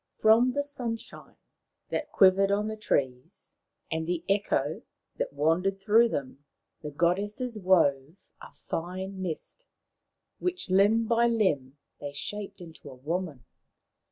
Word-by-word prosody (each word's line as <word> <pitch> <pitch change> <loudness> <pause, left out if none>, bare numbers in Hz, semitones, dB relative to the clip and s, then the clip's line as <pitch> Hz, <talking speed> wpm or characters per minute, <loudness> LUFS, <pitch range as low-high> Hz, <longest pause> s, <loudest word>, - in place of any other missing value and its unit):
From 230 +3 +5
the 285 - 0
Sunshine 245 -6 -3 0.5
that - - -3
quivered 195 0 +5
on 205 +1 +1
the 220 - -4
trees 130 -12 -3 0.3
and 160 0 -2
the 175 -1 -2
Echo 195 -7 0 0.4
that - - -2
wandered 165 +7 +1
through 220 +4 +4
them, 140 -4 -5 0.4
the 150 - -5
goddesses 205 - -1
wove 165 -4 +1
a - - -11
fine 185 +3 -5
mist, 185 - -5 0.7
which 360 - -3
limb 205 +4 +4
by 235 +1 +3
limb 150 - 0 0.2
they 145 -1 -6
shaped 200 +7 -6
into 160 -4 -11
a 130 - -11
woman. 150 -1 -4
190 Hz, 130 wpm, -28 LUFS, 155-215 Hz, 0.7 s, From